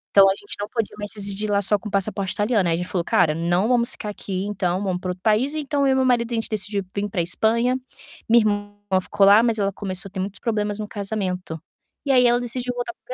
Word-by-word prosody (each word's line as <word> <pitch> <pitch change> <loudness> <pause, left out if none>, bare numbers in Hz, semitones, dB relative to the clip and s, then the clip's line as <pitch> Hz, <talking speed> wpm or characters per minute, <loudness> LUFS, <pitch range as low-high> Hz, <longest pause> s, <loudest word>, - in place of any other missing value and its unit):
Então 195 -1 +8
a - - +3
gente 205 - -6
não 205 - -3
podia 225 -2 -3
mais 205 -1 -5
residir 205 +1 -1
lá 200 -1 +2
só 205 +1 +4
com 210 - -7
passaporte 195 0 -1
italiano. 205 -3 +1
Ai 165 - +2
a - - -2
gente 180 +1 -4
falou: 180 -3 -1
"Cara, 160 -2 +2
não 175 +5 +1
vamos 240 -1 +2
ficar 210 - -6
aqui, 195 -2 -4
então 190 -2 -1
vamos 185 -2 -1
pra 185 - -4
outro 180 0 -6
país". 235 +7 +2
Então 290 -2 0
eu 265 - +4
e - - +1
meu 260 0 +2
marido, 240 -2 +2
a - - +1
gente 225 - -1
decidiu 205 -1 -1
vim 205 0 -1
pra 190 - -3
Espanha. 230 +8 +1 0.5
Minha 235 +1 +6
irmã 205 -1 -1 0.3
ficou 200 +1 +2
lá, 200 +2 +7
mas 230 -1 +1
ela 200 -1 0
começou 190 -1 -3
a - - -32
ter 190 - -6
muitos 190 +1 -4
problemas 210 -3 -1
no 215 -1 -5
casamento 195 -5 -4 0.5
e 280 - +1
aí 250 -2 +5
ela 240 0 +3
decidiu 245 +1 -3
voltar 245 +8 -4
para - - -59
205 Hz, 255 wpm, -22 LUFS, 195-230 Hz, 0.5 s, Então